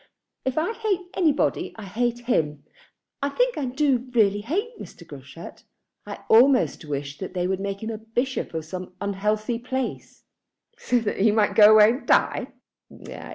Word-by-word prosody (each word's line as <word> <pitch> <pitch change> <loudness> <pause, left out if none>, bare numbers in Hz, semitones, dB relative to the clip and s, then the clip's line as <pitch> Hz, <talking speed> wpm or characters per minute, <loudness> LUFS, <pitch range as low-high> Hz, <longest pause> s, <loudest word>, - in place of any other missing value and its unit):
If 260 +1 -2
I 335 +8 0
hate 390 -6 -2
anybody, 315 -6 0
I 220 - -8
hate 240 +5 -2
him. 150 - -1 0.6
I 280 - 0
think - - +1
I 285 - -2
do 260 -1 0
really 205 -2 +3
hate 405 - -3
Mr. - - -11
Groschut. - - -11 0.5
I - - -7
almost 250 -1 +4
wish 140 -1 -5
that 190 -1 -7
they 180 -1 0
would 190 +1 -1
make 200 +1 -4
him 220 0 -6
bishop 260 -7 -2
of 160 -1 -3
some 180 +2 -8
unhealthy 210 +3 -1
place." 260 +1 -5 0.5
"So 465 - 0
that 210 - -3
he 215 +3 +4
might 210 -1 +2
go 210 0 +8
away 215 +1 +7
and 250 - -6
die?" - - +2
225 Hz, 160 wpm, -24 LUFS, 200-270 Hz, 0.6 s, go